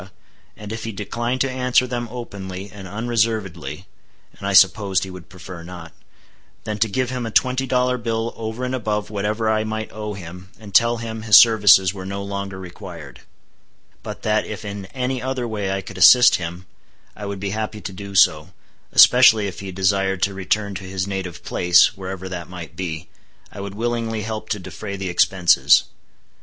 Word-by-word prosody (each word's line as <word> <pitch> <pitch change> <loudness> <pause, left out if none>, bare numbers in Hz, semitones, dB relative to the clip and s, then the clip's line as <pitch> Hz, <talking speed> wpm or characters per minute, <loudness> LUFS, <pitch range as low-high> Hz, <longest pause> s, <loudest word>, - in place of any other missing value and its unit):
and 105 0 -7
if 110 0 -6
he 115 - -4
declined 120 +5 -3
to 135 0 0
answer 125 -1 +2
them 120 -1 -4
openly 100 -5 -7
and 100 -2 -10
unreservedly 105 - -2 0.5
(and 100 - -6
I 100 - -1
supposed 95 0 +4
he 95 - -7
would 90 -2 -11
prefer 90 -1 -10
not), 85 -1 -10 0.7
then 105 -1 -4
to 110 +1 +2
give 130 +5 -1
him 125 -1 -3
a - - -4
twenty 130 +4 +1
dollar 125 0 +1
bill 115 0 -2
over 110 +3 -5
and 125 - -3
above 105 -4 -2
whatever 105 +2 -2
I 110 0 +1
might 110 0 -4
owe 105 -1 -5
him, 90 0 -10
and 105 -3 -12
tell 115 +2 +4
him 110 -1 -6
his 110 -1 +7
services 105 -5 +6
were 95 -2 -8
no 100 +1 -4
longer 100 -1 -5
required; 85 - -10 0.8
but - - -8
that 110 0 +1
if 110 0 -7
in 100 -1 -6
any 130 +1 -3
other 130 -1 -3
way 105 -4 -3
I 95 0 -2
could 95 0 -10
assist 125 +5 +8
him, 85 +1 -7 0.5
I 105 - -7
would 100 -1 -5
be 100 0 -3
happy 110 0 -4
to 95 - -7
do 100 +1 -9
so, 80 -2 +3 0.4
especially 125 -4 +7
if 95 -3 -6
he 95 -1 -7
desired 95 0 0
to 100 - +1
return 100 +2 -1
to 95 0 -7
his 95 0 -3
native 95 -3 -5
place, 90 +4 +4
wherever 95 -1 -6
that 90 -2 -7
might 85 -3 -9
be, 80 -3 -5 0.4
I 100 - -8
would 100 0 -7
willingly 115 -1 -2
help 110 0 -5
to 105 - -1
defray 95 +2 -7
the 95 -1 -4
expenses. 90 0 +4
100 Hz, 185 wpm, -21 LUFS, 95-115 Hz, 0.8 s, assist